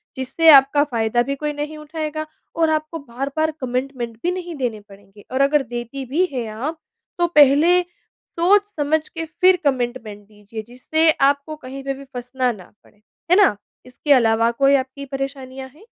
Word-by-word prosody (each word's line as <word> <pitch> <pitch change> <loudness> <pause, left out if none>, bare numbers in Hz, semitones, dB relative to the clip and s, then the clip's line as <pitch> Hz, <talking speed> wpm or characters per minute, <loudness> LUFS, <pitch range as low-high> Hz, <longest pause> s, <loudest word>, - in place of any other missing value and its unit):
जिससे 265 +5 -1
आपका 280 0 +7
फ़ायदा 235 -4 0
भी 275 +2 -3
कोई 300 +1 -3
नहीं 295 +1 -5
उठाएगा 310 0 -5 0.3
और 325 -1 +2
आपको 310 +1 -2
बार-बार 280 +4 -2
कमिटमेंट 250 -2 -3
भी 355 - +1
नहीं 355 -2 -5
देने 245 -6 -3
पड़ेंगे। 200 +1 -17
और 260 +1 0
अगर 280 +1 +3
देती 240 +2 -6
भी 305 +9 +1
है 245 -3 -2
आप, 270 +10 -5 0.4
तो 345 - +3
पहले 300 +3 +5 0.6
सोच-समझ 335 -5 +2
के 330 -1 -5
फ़िर 365 +4 +3
कमिटमेंट 240 -6 -2
दीजिए 210 +1 -9
जिससे 315 +7 +1 0.2
आपको 285 +2 -3
कहीं 270 -2 -9
पे 275 0 -2
भी 275 +1 -11
फँसना 250 0 -2
ना 190 -6 -12
पड़े। 210 - -26 0.3
है 360 - +7
ना? 400 - +5 0.3
इसके 270 +3 +1
अलावा 230 -2 +3
कोई 275 +3 +3
आपकी 265 +1 -3
परेशानियाँ 270 -1 -6
हैं? 390 +8 -18
275 Hz, 165 wpm, -21 LUFS, 245-310 Hz, 0.6 s, आपका